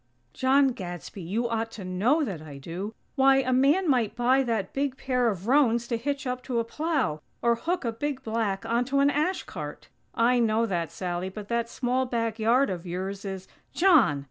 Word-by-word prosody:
"John 270 +1 +4
Gadsby, 185 -4 -7
you 210 +8 -1
ought 225 -1 -2
to 195 - -7
know 220 - +2
that 190 - -4
I 150 -3 -9
do. 180 +10 -6 0.2
Why! 270 -1 +5
A 255 - 0
man 285 +9 +3
might 240 -6 +2
buy 250 +2 +3
that 225 -7 -2
big 275 -1 -1
pair 250 -3 +1
of 195 -3 -4
roans 240 -3 +3
to 235 - +1
hitch 280 +4 -3
up 250 0 -2
to 250 -3 -2
a 230 - +2
plow! 270 - -1 0.2
Or 235 0 +4
hook 330 +6 -2
a 230 - 0
big 265 +3 -4
black 220 -2 -1
onto 245 +4 0
an 280 +1 +4
ash 310 +6 0
cart!" - - -8 0.3
"I 245 +2 +3
know 225 0 +2
that, 175 -6 -2
Sally, 180 0 -3
but 205 +1 -9
that 235 0 0
small 255 +2 -1
back 230 -2 -2
yard 235 +2 +3
of 175 -2 -4
yours 190 +3 -4
is 190 -1 -5 0.2
" - - -37
"_John!! 310 - +5
235 Hz, 200 wpm, -27 LUFS, 200-265 Hz, 0.3 s, Why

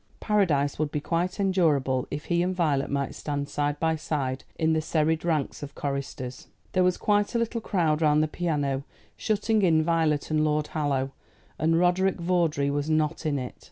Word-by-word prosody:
Paradise 160 -11 +1
would 155 -1 0
be 150 - -2
quite 175 +6 -2
endurable 155 -10 +2
if 150 - -5
he 170 0 +1
and 185 +1 0
Violet 150 -6 +1
might 140 -1 -1
stand 145 -1 -3
side 145 0 -1
by 160 0 +1
side 135 -4 -3
in 160 0 +2
the 160 - +1
serried 160 0 0
ranks 155 -5 -1
of 145 -1 -8
choristers. 135 -2 -5 0.2
There 185 - +2
was 180 0 +2
quite 205 +2 +1
a - - +4
little 230 0 -1
crowd 165 -7 +1
round 150 -1 +4
the - - +1
piano, 145 -5 -1 0.3
shutting 215 0 +1
in 160 -4 +4
Violet 160 -3 +1
and 155 0 +2
Lord 150 0 +1
Hallow, 140 -3 -1 0.5
and 165 +2 +3
Roderick 180 +2 +2
Vawdrey 170 -5 +1
was 145 +1 -2
not 155 +1 0
in 145 -2 0
it. 125 -2 -4
155 Hz, 185 wpm, -26 LUFS, 145-175 Hz, 0.5 s, a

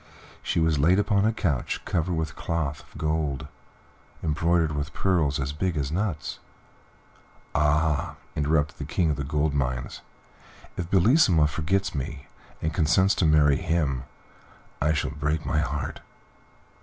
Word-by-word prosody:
She - - -1
was 80 -2 +2
laid 85 +6 +4
upon 100 0 +2
a 110 - +3
couch 75 - -1
covered 85 0 0
with 80 0 -3
cloth 80 -4 -2
of - - -16
gold, 75 -3 -1 0.8
embroidered 80 +1 +2
with 75 +1 -3
pearls 80 -6 +1
as 70 +1 -2
big 85 +2 -1
as 70 -1 -1
nuts." 85 -5 -2 1.1
"Ah!" 75 0 +1 0.2
interrupted 75 0 0
the - - -6
King 85 -3 +2
of - - 0
the 70 - -3
Gold 75 +2 0
Mines, 65 -3 -2 0.7
"if 85 -1 -4
Bellissima 95 - +5
forgets 85 +6 0
me, 70 0 -5 0.4
and 80 0 0
consents 85 +6 +3
to 90 - +2
marry 75 -2 +5
him, 80 -7 -1 0.8
I 75 +2 +3
shall 75 -4 -1
break 75 +2 -2
my 75 - +1
heart." 75 -1 -3
75 Hz, 145 wpm, -26 LUFS, 75-85 Hz, 1.1 s, Bellissima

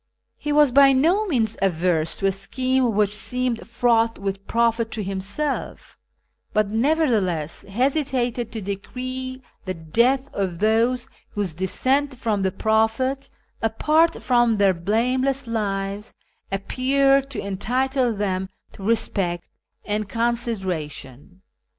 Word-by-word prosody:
He 295 - -3
was 295 -2 +5
by 275 +1 +7
no 345 +11 +3
means 225 - 0
averse 175 -3 +1
to 195 - -3
a 195 - +4
scheme 250 +4 0
which 205 -1 +2
seemed 250 +2 -2
fraught 230 -1 +2
with 195 0 -4
profit 230 -1 +1
to 215 - -2
himself, 200 +10 -4 0.6
but 215 -1 +2
nevertheless 220 - +1
hesitated 250 0 0
to 220 - -5
decree 255 +6 -5 0.2
the 185 -1 -3
death 235 - +1
of 190 -4 -2
those 225 +5 +2 0.3
whose 200 -6 -2
descent 260 - 0
from 220 -5 -1
the 190 -1 +1
Prophet, 225 +7 0 0.3
apart 305 +9 +2
from 240 -3 +3
their 200 -2 +4
blameless 250 +9 0
lives, 200 -2 -3 0.4
appeared 270 +7 +2
to 255 -6 -4
entitle 250 +6 0
them 190 -3 -2 0.2
to - - -13
respect 195 -5 0 0.4
and 210 -1 -2
consideration. 190 - -3
225 Hz, 120 wpm, -23 LUFS, 195-260 Hz, 0.6 s, by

